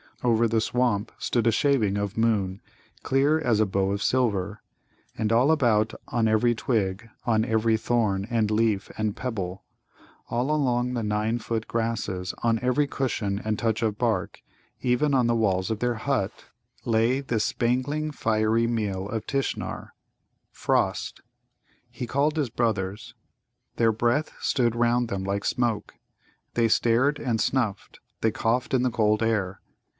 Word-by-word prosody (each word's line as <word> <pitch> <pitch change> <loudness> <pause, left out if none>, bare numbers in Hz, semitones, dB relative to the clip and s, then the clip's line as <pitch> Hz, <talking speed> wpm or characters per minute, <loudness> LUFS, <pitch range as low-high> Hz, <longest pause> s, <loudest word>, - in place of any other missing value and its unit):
Over 115 -1 +3
the 110 0 +1
swamp 115 -3 0
stood 120 -2 0
a - - +5
shaving 110 -6 +2
of 100 +1 -3
moon, 105 -4 +1 0.4
clear 140 +4 +2
as 120 -8 +1
a 110 - +4
bow 95 0 0
of 100 0 -2
silver. 105 -5 0 0.6
And 110 -1 0
all 125 +6 +4
about, 115 -8 +2 0.2
on 115 -3 +1
every 110 +2 +3
twig, 110 -2 -1 0.2
on 110 -2 +2
every 110 0 +2
thorn, 110 -4 0
and 110 -3 +1
leaf, 105 -3 +1
and 110 -2 -1
pebble; 95 -7 -4 0.7
all 125 +5 0
along 125 -4 +1
the 120 - -1
nine 105 +2 0
foot 115 -1 -3
grasses, 110 -5 -2
on 115 -1 +2
every 125 +4 +2
cushion 110 -8 -2
and 110 -1 -1
touch 115 -1 0
of 110 -2 0
bark, 115 -2 -1 0.4
even 130 +3 +2
on 125 -2 +3
the 120 0 +2
walls 100 -2 +1
of 110 - -2
their 120 0 0
hut, 115 -3 -2 0.4
lay 115 +3 +2
this 115 -6 -1
spangling 130 +6 0
fiery 110 -2 +1
meal 100 -5 -2
of 110 -1 -3
Tishnar 135 -1 -3 0.6
frost. - - -1 0.7
He 120 +1 -6
called 145 +5 +1
his 145 -5 0
brothers. 110 0 -2 0.6
Their 115 -1 +4
breath 120 +7 0
stood 120 -4 +1
round 120 0 +2
them 95 -2 -3
like 100 +1 -2
smoke. 120 -4 -1 0.6
They 115 -1 +3
stared 125 +6 +2
and 115 -6 -1
snuffed, 120 -7 -1 0.2
they 110 - +2
coughed 120 +5 0
in 125 - +2
the 125 - +1
cold 110 0 +2
air. 100 -4 -1
115 Hz, 150 wpm, -26 LUFS, 105-125 Hz, 0.7 s, a